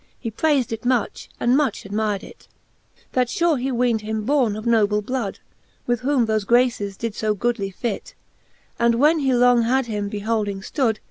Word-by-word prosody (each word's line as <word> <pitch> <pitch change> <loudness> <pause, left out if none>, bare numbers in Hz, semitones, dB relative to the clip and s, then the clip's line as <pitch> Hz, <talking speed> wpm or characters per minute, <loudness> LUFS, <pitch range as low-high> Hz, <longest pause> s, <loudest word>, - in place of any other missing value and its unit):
He 230 - -4
prayfd 275 0 +1
it 225 -1 -4
much, 245 -3 -1
and 245 +2 +3
much 280 -6 0
admyred 205 0 -2
it; - - -14 0.6
That 250 -1 +1
fure 335 0 +1
he 265 +1 -1
weendhim 220 -3 0
borne 255 -6 +2
of 215 +1 -7
noble 210 -3 +2
blood, 240 -3 -3 0.5
With 240 -1 0
whom 260 -1 +1
thole 220 -1 +1
graces 215 -3 +1
did 230 -2 -3
To 215 0 -1
goodly 210 -2 -1
fit: 205 +3 -5 0.6
And 235 0 +3
when 300 +6 +4
he 270 -2 +1
long 245 -1 +4
had 255 +3 +1
him 210 -3 -3
beholding 205 -1 -2
ftood. 225 +1 0
230 Hz, 175 wpm, -22 LUFS, 210-255 Hz, 0.6 s, when